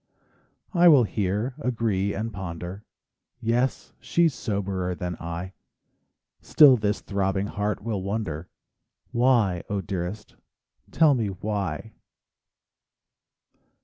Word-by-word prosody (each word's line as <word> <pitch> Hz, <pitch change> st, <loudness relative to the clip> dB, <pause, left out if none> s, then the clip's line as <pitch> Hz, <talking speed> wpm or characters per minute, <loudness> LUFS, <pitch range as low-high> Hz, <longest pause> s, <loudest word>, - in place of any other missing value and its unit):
I 175 Hz, -1 st, +6 dB
will 145 Hz, -7 st, +8 dB
hear, 105 Hz, +3 st, -1 dB
agree, 110 Hz, -7 st, -1 dB
and 110 Hz, +2 st, -3 dB
ponder: 90 Hz, +1 st, -6 dB, 0.6 s
"Yes, 120 Hz, +3 st, -1 dB
she's 170 Hz, -3 st, +2 dB
soberer 100 Hz, -6 st, -2 dB
than 90 Hz, -1 st, -4 dB
I;" 85 Hz, +3 st, -5 dB, 0.9 s
Still 145 Hz, -4 st, +7 dB
this 105 Hz, -2 st, -1 dB
throbbing 95 Hz, -1 st, -1 dB
heart 105 Hz, 0 st, -2 dB
will 105 Hz, -4 st, -2 dB
wonder, 95 Hz, -5 st, -3 dB, 0.6 s
"Why, 120 Hz, -8 st, +3 dB
0 100 Hz, -1 st, -2 dB
dearest, 95 Hz, +3 st, -5 dB, 0.5 s
tell 155 Hz, -2 st, +4 dB
me 115 Hz, -5 st, 0 dB
why 100 Hz, 0 st, -4 dB
100 Hz, 100 wpm, -25 LUFS, 95-115 Hz, 0.9 s, will